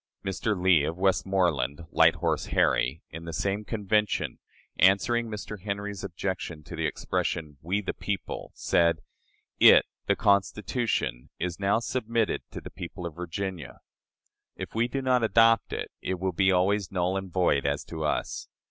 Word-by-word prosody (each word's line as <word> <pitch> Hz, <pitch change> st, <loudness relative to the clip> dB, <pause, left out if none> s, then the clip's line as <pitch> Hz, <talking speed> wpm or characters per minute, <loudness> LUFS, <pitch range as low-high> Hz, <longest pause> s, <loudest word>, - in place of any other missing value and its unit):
" -, -, -28 dB
Mr. 95 Hz, +2 st, -1 dB
Lee, 90 Hz, -5 st, +5 dB
of 80 Hz, +3 st, -2 dB
Westmoreland 90 Hz, -7 st, +1 dB
("Light -, -, +5 dB
Horse -, -, -1 dB
Harry"), 65 Hz, +6 st, +1 dB
in 80 Hz, +2 st, -8 dB
the 85 Hz, -, -6 dB
same 100 Hz, +5 st, -1 dB
Convention, 105 Hz, -1 st, 0 dB, 0.4 s
answering 115 Hz, +5 st, +4 dB
Mr. 105 Hz, -1 st, -6 dB
Henry's 100 Hz, 0 st, -4 dB
objection 90 Hz, -3 st, -4 dB
to -, -, -8 dB
the -, -, 0 dB
expression, 75 Hz, -4 st, -3 dB
"We, 95 Hz, +6 st, -1 dB
the -, -, -2 dB
people," 100 Hz, -2 st, -4 dB
said: 85 Hz, 0 st, +2 dB, 0.6 s
"It -, -, +8 dB, 0.2 s
[the -, -, +3 dB
Constitution] 100 Hz, -, 0 dB
is 90 Hz, 0 st, -3 dB
now 100 Hz, +2 st, +2 dB
submitted 115 Hz, -2 st, -1 dB
to -, -, -7 dB
the -, -, -10 dB
people 90 Hz, +1 st, -7 dB
of 85 Hz, -, -5 dB
Virginia. 90 Hz, -4 st, -5 dB, 0.7 s
If -, -, -7 dB
we 115 Hz, +2 st, +1 dB
do 135 Hz, +2 st, -3 dB
not 125 Hz, -2 st, +3 dB
adopt 115 Hz, -1 st, +4 dB
it, -, -, -4 dB
it 95 Hz, -1 st, -3 dB
will 95 Hz, 0 st, 0 dB
be 95 Hz, +2 st, +3 dB
always 95 Hz, +2 st, +1 dB
null 90 Hz, 0 st, 0 dB
and 95 Hz, -1 st, -4 dB
void 80 Hz, -6 st, +2 dB
as 70 Hz, 0 st, -1 dB
to 80 Hz, -2 st, -6 dB
us. 75 Hz, -, -2 dB
95 Hz, 160 wpm, -27 LUFS, 85-105 Hz, 0.7 s, It